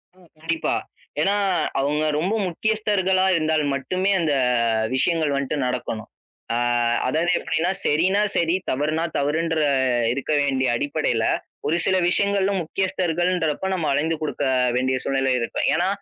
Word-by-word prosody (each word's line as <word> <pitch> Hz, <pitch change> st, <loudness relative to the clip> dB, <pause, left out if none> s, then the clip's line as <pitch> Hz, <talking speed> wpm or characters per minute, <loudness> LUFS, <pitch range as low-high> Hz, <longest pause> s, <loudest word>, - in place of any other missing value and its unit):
அ -, -, -24 dB, 0.2 s
கண்டிப்பா. 165 Hz, +1 st, -1 dB, 0.5 s
ஏன்னா 195 Hz, +5 st, +2 dB, 0.4 s
அவுங்க 145 Hz, +3 st, 0 dB, 0.2 s
ரொம்ப 185 Hz, +7 st, 0 dB
முக்கியஸ்தர்களா 190 Hz, 0 st, +1 dB
இருந்தால் 155 Hz, -1 st, +1 dB
மட்டுமே 185 Hz, +9 st, -1 dB
அந்த, 155 Hz, -3 st, +1 dB, 0.6 s
விஷயங்கள் 160 Hz, +2 st, +1 dB
வன்ட்டு 140 Hz, +1 st, -2 dB
நடக்கணும். 120 Hz, -3 st, -4 dB, 0.5 s
ஆ -, -, +1 dB, 0.5 s
அதாவது 160 Hz, +7 st, +1 dB
எப்டின்னா, 165 Hz, +3 st, -1 dB
செரினா, 180 Hz, +7 st, +2 dB, 0.2 s
செரி, 170 Hz, +1 st, +2 dB
தவறுனா, 155 Hz, +4 st, 0 dB
தவறுன்ற 160 Hz, +3 st, 0 dB, 0.5 s
இருக்க 140 Hz, +3 st, -4 dB
வேண்டிய 135 Hz, -2 st, +1 dB
அடிப்படையில, 140 Hz, -3 st, -1 dB, 0.4 s
ஒரு 160 Hz, +3 st, +1 dB
சில 190 Hz, -, +2 dB
விஷயங்களும், 200 Hz, +1 st, +1 dB
முக்கியஸ்தர்கள்ன்றப்ப 180 Hz, -1 st, -1 dB
நம்ம 165 Hz, -4 st, -2 dB
அலைந்து 160 Hz, +4 st, 0 dB
குடுக்க 150 Hz, -2 st, -3 dB, 0.3 s
வேண்டிய 130 Hz, +1 st, +1 dB
சூழ்நிலைகள் 135 Hz, -2 st, +1 dB
இருக்கும். 115 Hz, -, -1 dB
ஏன்னா, 175 Hz, +3 st, +1 dB
160 Hz, 125 wpm, -23 LUFS, 140-185 Hz, 0.6 s, ஏன்னா